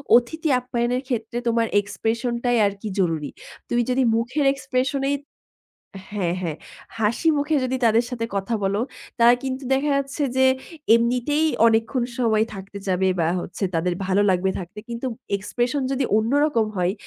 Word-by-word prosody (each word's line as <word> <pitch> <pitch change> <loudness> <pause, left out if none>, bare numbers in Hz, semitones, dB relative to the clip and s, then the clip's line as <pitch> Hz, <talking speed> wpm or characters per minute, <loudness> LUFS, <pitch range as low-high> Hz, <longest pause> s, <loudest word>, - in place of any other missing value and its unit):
অতিথি 310 +7 +1
আপ্যায়নের 245 0 -1
ক্ষেত্রে 235 -2 -3
তোমার 230 0 +2
expression 230 +4 -2
টাই 245 -1 +2
আরকি 200 +2 -3
জরুরী। 165 -5 0 0.4
তুমি 240 - +2
যদি 255 +1 +2
মুখের 250 +6 0
expression 270 0 -1
এই" - - +2 1.0
হ্যাঁ, 185 -5 -1
হ্যাঁ, 160 -4 -3 0.4
"হাসি 225 +9 +1
মুখে 295 +2 +1
যদি 255 0 -1
তাদের 230 +2 +4
সাথে 230 -2 -3
কথা 195 +4 -1
বলো, 195 +1 +1 0.4
তারা 235 +1 +7
কিন্তু 265 0 -3
দেখা 275 +3 +1
যাচ্ছে 280 +2 -2
যে 265 - +5 0.5
এমনিতেই 250 +6 +1 0.2
অনেকক্ষণ 225 +3 +1 0.2
সময় 220 -3 +3
থাকতে 195 0 -8
চাবে 190 0 +2
বা 165 - +2
হচ্ছে 190 - -6
তাদের 175 +2 +1
ভালো 195 +1 +3
লাগবে 190 +1 +2
থাকতে। 180 +3 -8
কিন্তু 235 +2 -3 0.3
expression 240 +7 -1
যদি 270 0 0
অন্য 220 +2 0
রকম 235 -8 +1
হয়, 180 +1 +1
235 Hz, 155 wpm, -23 LUFS, 200-260 Hz, 1.0 s, তারা